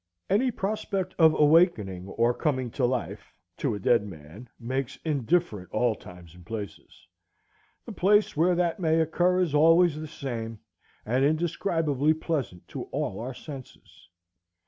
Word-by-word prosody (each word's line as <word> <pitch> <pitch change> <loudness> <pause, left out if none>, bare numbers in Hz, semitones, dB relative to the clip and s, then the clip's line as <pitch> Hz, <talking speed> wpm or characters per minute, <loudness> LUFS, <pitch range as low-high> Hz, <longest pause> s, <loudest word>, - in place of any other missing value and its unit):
Any 240 +7 +3
prospect 195 -3 -3
of 160 -1 +5
awakening 145 - +3
or 115 +4 +1
coming 130 -4 -1
to 130 - 0
life 125 -1 -3 0.2
to - - -1
a - - -5
dead 115 +2 +3
man 95 +5 -11
makes 130 +2 -3
indifferent 140 - 0
all 115 +4 +1
times 90 -5 -13
and 90 0 -15
places. 105 +1 -8 0.8
The - - -7
place 205 +3 +3
where 175 +4 +3
that 175 0 0
may 160 -2 +2
occur 175 +3 +2
is 170 -5 0
always 165 +1 +5
the 155 - -6
same, 115 -6 -5 0.5
and 125 +5 +1
indescribably 155 -1 +1
pleasant 145 - -4
to - - -6
all 95 - -3
our 125 +3 -5
senses. 130 - -12
140 Hz, 145 wpm, -27 LUFS, 115-165 Hz, 0.8 s, of